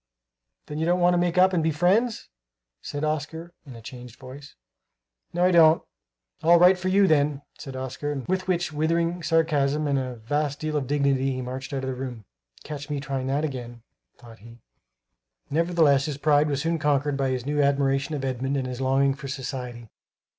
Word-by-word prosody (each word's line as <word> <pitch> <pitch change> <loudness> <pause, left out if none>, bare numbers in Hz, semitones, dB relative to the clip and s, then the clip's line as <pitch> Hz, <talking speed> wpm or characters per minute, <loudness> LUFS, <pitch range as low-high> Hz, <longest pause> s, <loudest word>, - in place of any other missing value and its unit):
"Then 150 +1 -6
you 160 - 0
don't 175 +1 +2
want 175 0 +4
to 175 - +2
make 175 0 0
up 185 +1 +5
and 175 - +2
be 160 - +1
friends?" 190 +9 +1 0.5
said 145 +1 -5
Oscar, 155 +3 -3
in 130 - -10
a 115 - -12
changed 125 -1 -10
voice. 135 +2 -12 0.8
"No, 175 +1 +1
I 185 - +4
don't." 165 -2 +6 0.6
"All 170 +2 +6
right 180 +2 +6
for 185 +1 -5
you, 195 +2 +4
then!" 145 -4 +2 0.2
said 135 -3 -8
Oscar. 130 +3 -4
With 185 0 -1
which 175 -3 -1
withering 165 +3 0
sarcasm 155 -3 +1
and 140 -2 +1
a 130 -1 -4
vast 145 +5 -2
deal 155 0 -3
of 140 -3 -1
dignity 135 -1 +1
he 130 - -4
marched 130 +1 -6
out 135 -1 -3
of - - -3
the - - -2
room. 125 -4 -7 0.4
"Catch 145 -1 -7
me 145 -1 -2
trying 135 -2 -3
that 140 +3 0
again," 120 -5 -7 0.3
thought 115 -2 -15
he. 115 +3 -14 0.9
Nevertheless 160 -3 +3
his 150 -3 -4
pride 150 0 +3
was 140 -1 -1
soon 165 0 0
conquered 145 -1 +1
by 135 -1 0
his 130 -1 -2
new 145 +1 0
admiration 140 +1 +1
of 135 -2 -3
Edmund 135 +2 -2
and 130 - -2
his 125 0 -5
longing 135 +1 +2
for 140 0 -9
society. 125 -4 -6
145 Hz, 195 wpm, -25 LUFS, 130-160 Hz, 0.9 s, don't